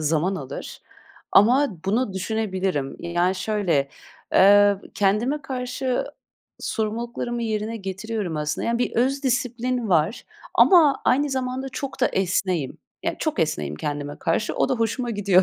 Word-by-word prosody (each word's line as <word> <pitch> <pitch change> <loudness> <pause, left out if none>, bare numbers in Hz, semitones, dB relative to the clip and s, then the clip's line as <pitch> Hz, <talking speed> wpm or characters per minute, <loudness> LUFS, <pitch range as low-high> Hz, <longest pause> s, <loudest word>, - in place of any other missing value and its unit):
zaman 160 +5 +1
alır. 140 -5 -7 0.5
Ama 255 +8 +5 0.2
bunu 215 +2 0
düşünebilirim. 190 -7 -2
Yani, 175 +2 0
şöyle, 185 -8 0 0.4
eee, 205 +1 +6 0.2
kendime 220 +9 +1
karşı 255 0 -2 0.6
sorumluluklarımı 235 +2 -3
yerine 220 0 -2
getiriyorum 195 -3 -4
aslında. 150 0 -2
Yani, 235 0 +1
bir 245 - 0
öz 270 +4 +1
disiplin 245 -1 -1
var 170 +4 +1 0.3
ama 315 -7 +6
aynı 285 +2 +2
zamanda 260 0 -2
çok 270 +1 -6
da 250 - +5
esneğim. 185 -5 -1 0.2
Yani, - - -2
çok 315 -8 -2
esneğim 75 - -1
kendime 145 - -4
karşı. 170 +6 0
O - - +1
da 260 - +1
hoşuma 235 +1 -1
gidiyor, 200 -3 +3
215 Hz, 130 wpm, -23 LUFS, 185-250 Hz, 0.6 s, eee